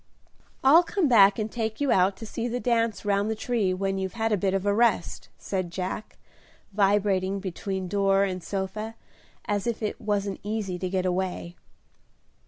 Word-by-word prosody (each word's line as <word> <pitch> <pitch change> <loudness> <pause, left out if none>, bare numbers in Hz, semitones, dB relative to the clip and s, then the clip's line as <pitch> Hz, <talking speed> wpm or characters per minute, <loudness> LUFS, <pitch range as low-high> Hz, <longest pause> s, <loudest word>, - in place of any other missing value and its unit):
"I'll 290 +6 +8
come 355 -1 0
back 205 -5 +6
and 215 -1 -3
take 220 -2 -3
you 285 -3 +1
out 190 +1 +3
to 225 - -8
see 230 +2 -4
the 245 +1 -2
dance 230 -3 0
round 200 +1 +1
the 220 - -1
tree 220 -4 0
when 195 +1 -1
you've 190 -1 -3
had 225 -1 0
a - - +4
bit 195 0 0
of 195 0 -1
a 205 - +3
rest," 220 -5 +1
said 185 -3 -3
Jack, 185 +4 -5 0.6
vibrating 195 -1 +2
between 190 0 -4
door 195 0 +2
and 185 -2 -2
sofa 205 +4 -4 0.5
as 205 +1 -1
if 230 -1 -2
it 210 - -3
wasn't 205 -2 -1
easy 205 -4 -3
to 185 - -2
get 185 0 -1
away. 180 -1 -2
200 Hz, 180 wpm, -26 LUFS, 190-220 Hz, 0.6 s, I'll